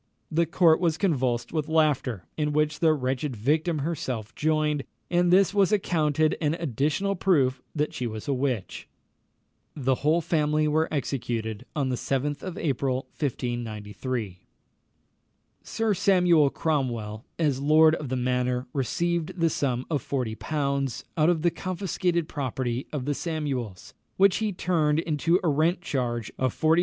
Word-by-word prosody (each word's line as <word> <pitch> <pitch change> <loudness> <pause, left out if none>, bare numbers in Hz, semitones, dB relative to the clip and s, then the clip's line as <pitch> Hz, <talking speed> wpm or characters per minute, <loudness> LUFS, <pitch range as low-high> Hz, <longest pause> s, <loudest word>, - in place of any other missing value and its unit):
The 165 +1 +2
court 165 -1 +4
was 165 -3 +1
convulsed 130 - 0
with 155 -1 -1
laughter, 145 - +1
in 150 -1 -1
which 150 0 +1
the 160 -2 +4
wretched 130 -1 -1
victim 155 +8 +1
herself 130 -9 -3
joined; 155 -2 +1 0.3
and 175 0 +3
this 195 +2 +5
was 200 -1 +3
accounted 155 -6 +2
an 155 0 +1
additional 165 - -1
proof 145 -9 +2
that 150 0 -1
she 125 - -3
was 110 -1 -6
a 140 - +1
witch. 125 -6 -2 0.9
The 135 -2 +1
whole 155 +4 +3
family 155 -2 +1
were 155 +2 +1
executed 115 -7 -3
on 140 -3 0
the 125 - 0
7th 140 +3 -2
of 185 -1 -6
April, 135 -4 -1
1593. 115 - -3 1.2
Sir 225 -2 -1
Samuel 180 -6 +4
Cromwell, 120 -9 -2
as 145 -5 +1
lord 155 +2 +6
of 150 -4 -3
the 130 - -1
manor, 125 0 0
received 170 +6 -1
the 165 -1 +3
sum 130 -3 -1
of 150 -5 -1
40l. 135 +1 -2
out 155 -1 +3
of 165 -3 +1
the 175 - +3
confiscated 180 -1 -1
property 130 -3 -3
of 140 -4 -3
the 145 - 0
Samuels, 140 - -4 0.2
which 195 -1 +5
he 215 -1 -1
turned 165 -5 +1
into 165 +2 +1
a - - +1
rent 160 +5 +2
charge 120 - -2
of 130 -2 -1
40s. 160 +2 +4
150 Hz, 150 wpm, -26 LUFS, 130-165 Hz, 1.2 s, lord